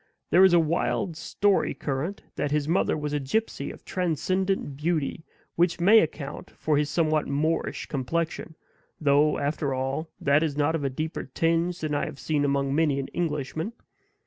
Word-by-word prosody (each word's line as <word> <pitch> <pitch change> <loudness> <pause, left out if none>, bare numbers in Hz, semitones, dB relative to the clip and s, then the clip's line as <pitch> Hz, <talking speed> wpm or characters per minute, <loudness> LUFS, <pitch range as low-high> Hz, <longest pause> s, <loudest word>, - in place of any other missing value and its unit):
There 185 - +7
is 190 -2 +6
a 175 - +7
wild 165 +1 0
story 200 +5 +1
current, 145 +8 -3
that 145 - -1
his 150 0 0
mother 165 -1 +2
was 150 -1 -3
a 145 - +1
gypsy 220 +12 -2
of - - -14
transcendent 185 -1 -1
beauty, 155 +1 -1 0.3
which 175 0 +2
may 205 +6 +7
account 150 -5 -3
for 155 - +1
his 150 0 0
somewhat 155 -2 +1
Moorish 155 +4 -1
complexion, 160 +4 -3 0.4
though, 145 0 +3
after 140 -1 -1
all, 135 +5 -2
THAT 140 +2 +3
is 150 -3 -1
not 150 +2 +2
of 160 -3 -2
a 135 - +1
deeper 155 +5 -4
tinge 165 +5 0
than 155 -1 -2
I 145 - 0
have - - -7
seen 150 0 0
among 140 -1 +1
many 150 -2 +2
an 135 - -4
Englishman. 160 - -3
155 Hz, 170 wpm, -26 LUFS, 145-170 Hz, 0.4 s, There